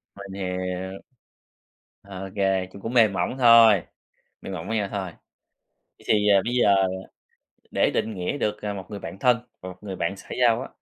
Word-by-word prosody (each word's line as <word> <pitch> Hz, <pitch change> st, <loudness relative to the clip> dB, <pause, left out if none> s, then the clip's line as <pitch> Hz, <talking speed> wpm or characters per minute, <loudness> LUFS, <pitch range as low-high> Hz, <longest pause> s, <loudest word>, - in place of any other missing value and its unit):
Mình 100 Hz, -1 st, -9 dB
hiểu. 90 Hz, +1 st, -4 dB, 1.0 s
OK, 95 Hz, -1 st, -8 dB, 0.4 s
cũng 100 Hz, -, -12 dB
cũng 115 Hz, +4 st, -5 dB
mềm 110 Hz, -5 st, +5 dB
mỏng 95 Hz, +5 st, -1 dB
thôi, 115 Hz, -6 st, +7 dB, 0.6 s
mềm 95 Hz, -, -7 dB
mỏng 90 Hz, 0 st, -6 dB
với 115 Hz, -, -1 dB
nhau 105 Hz, -2 st, -1 dB
thôi. 95 Hz, -3 st, -4 dB, 0.9 s
Vậy -, -, -20 dB
thì, 105 Hz, -1 st, +3 dB
ờ, 100 Hz, -2 st, +5 dB
bây 120 Hz, -, -2 dB
giờ 105 Hz, -5 st, +4 dB, 1.0 s
để -, -, +2 dB
định 110 Hz, -, -1 dB
nghĩa 90 Hz, +9 st, -3 dB
được, 105 Hz, -4 st, -2 dB
ờ, 105 Hz, -1 st, -3 dB
một 95 Hz, -2 st, -7 dB
người 105 Hz, -, -5 dB
bạn 85 Hz, +2 st, -8 dB
thân 125 Hz, +1 st, +4 dB, 0.2 s
và 95 Hz, -, -8 dB
một 90 Hz, 0 st, -10 dB
người 100 Hz, -2 st, -6 dB
bạn 100 Hz, +3 st, -2 dB
xã 95 Hz, -, -15 dB
giao 120 Hz, 0 st, +4 dB
á -, -, -7 dB
100 Hz, 190 wpm, -24 LUFS, 95-110 Hz, 1.0 s, thôi